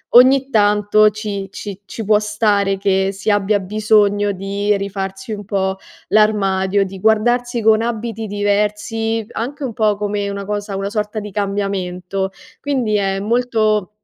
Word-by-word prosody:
ogni 265 +2 +6
tanto 210 -1 +4
ci 205 -2 -5
ci 200 -1 -7
ci 220 +1 -6
può 210 0 +4
stare 210 -2 +1
che 195 -1 +1
si 195 +2 -4
abbia 205 0 +2
bisogno 205 0 +2
di 200 +2 -1
rifarsi 195 +1 -5
un 205 -1 -6
po' 190 -1 -1 0.3
l'armadio, 200 -2 +2
di 190 0 -8
guardarsi 240 +3 +2
con 220 0 +4
abiti 225 -1 -3
diversi, 210 +2 -1
anche 275 +5 -4
un 245 - -4
po' 215 -1 +1
come 205 0 -2
una 200 0 -5
cosa 205 -1 -3
una 195 +1 -2
sorta 210 0 -2
di 210 -1 -7
cambiamento. 195 -2 -2 0.3
Quindi 255 -7 0
è 195 -1 0
molto 215 -2 +1
205 Hz, 145 wpm, -18 LUFS, 195-220 Hz, 0.3 s, ogni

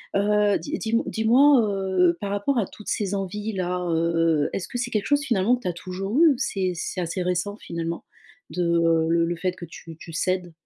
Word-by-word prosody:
Heu, 205 0 +3
dis 300 +2 -5
dis-m 230 +1 0
dis-moi, 250 +5 +4
heu, 190 -4 +1
par 200 -1 -4
rapport 205 +7 0
à 215 - +2
toutes 210 - -14
ces 205 -2 -1
envies-là, 190 -2 -3
heu 165 0 +1 0.4
heu, - - -7
est-ce 180 - -3
que - - -5
c'est 245 0 -2
quelque 215 -2 -1
chose, 285 +4 +2
finalement, 230 -2 +2
que - - -15
tu 185 - -4
as 175 - -1
toujours 195 - -3
eu? 325 - +8
Ou 280 - +2
c'est 185 -2 -1
c'est 180 +2 -4
assez 175 +2 -3
récent, 180 +3 -1
finalement, 170 -3 -5 0.5
de, 180 - -2
heu, 165 -1 +3
le 170 0 +3
le 170 +1 -2
fait 185 +2 -1
que 175 - -8
tu 165 0 -11
tu 165 - -10
cèdes? 180 +1 -1
190 Hz, 220 wpm, -24 LUFS, 175-215 Hz, 0.5 s, eu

